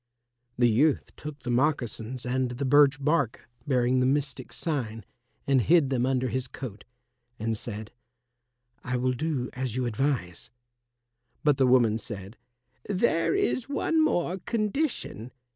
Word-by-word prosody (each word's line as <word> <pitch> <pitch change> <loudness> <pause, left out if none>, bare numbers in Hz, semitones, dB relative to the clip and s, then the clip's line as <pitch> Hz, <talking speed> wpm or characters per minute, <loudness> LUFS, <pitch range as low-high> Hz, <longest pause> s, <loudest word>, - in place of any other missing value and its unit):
The 120 0 +5
youth 135 +7 +2
took 150 -1 -7
the 125 - -3
moccasins 125 -3 -1
and 130 0 0
the 125 +3 -3
birch 145 +2 +5
bark 140 -4 0 0.2
bearing 130 -1 +2
the 130 - +3
mystic 135 -2 -1
sign 115 - -3 0.4
and 135 -2 +3
hid 155 0 +4
them 125 -1 +1
under 130 -1 +1
his 130 0 -2
coat, 115 -5 -8 0.5
and 110 +1 -1
said, 105 0 -7 0.9
"I 125 0 -1
will 130 +1 +1
do 140 -2 -2
as 125 -3 -3
you 130 -1 0
advise." 120 -6 -2 0.9
But 150 -3 +4
the 135 -2 +4
woman 120 -3 +4
said, 100 -1 -8 0.5
"There 195 - +2
is 280 - 0
one 315 +2 +2
more 180 - 0
condition. 215 - -2
130 Hz, 140 wpm, -27 LUFS, 120-150 Hz, 0.9 s, The